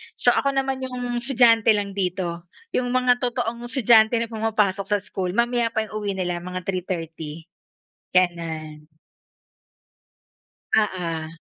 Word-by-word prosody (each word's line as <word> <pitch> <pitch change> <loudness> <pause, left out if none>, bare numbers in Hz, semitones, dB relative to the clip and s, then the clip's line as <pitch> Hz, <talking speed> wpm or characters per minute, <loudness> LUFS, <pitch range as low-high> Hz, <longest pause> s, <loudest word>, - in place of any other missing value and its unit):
So, - - +4
ako 275 0 +1
naman 270 0 0
'yong 250 -2 -3
estudyante 235 -3 +4
lang 200 -1 -2
dito. 180 -3 -3 0.2
'Yong 250 - 0
mga 250 -1 +3
totoong 240 -1 -2
estudyante 230 -2 +5
na 230 0 -1
pumapasok 210 -3 0
sa 205 0 +2
school, 185 -1 -4
mamaya 240 0 +2
pa 220 - +2
'yong 215 - -11
uwi 205 -1 -2
nila 180 -2 -2
mga 180 +1 -6
3:30, 165 -4 -4 0.8
ganun. 160 -4 -1 1.9
Oo. 165 -6 -1
205 Hz, 125 wpm, -23 LUFS, 180-240 Hz, 1.9 s, estudyante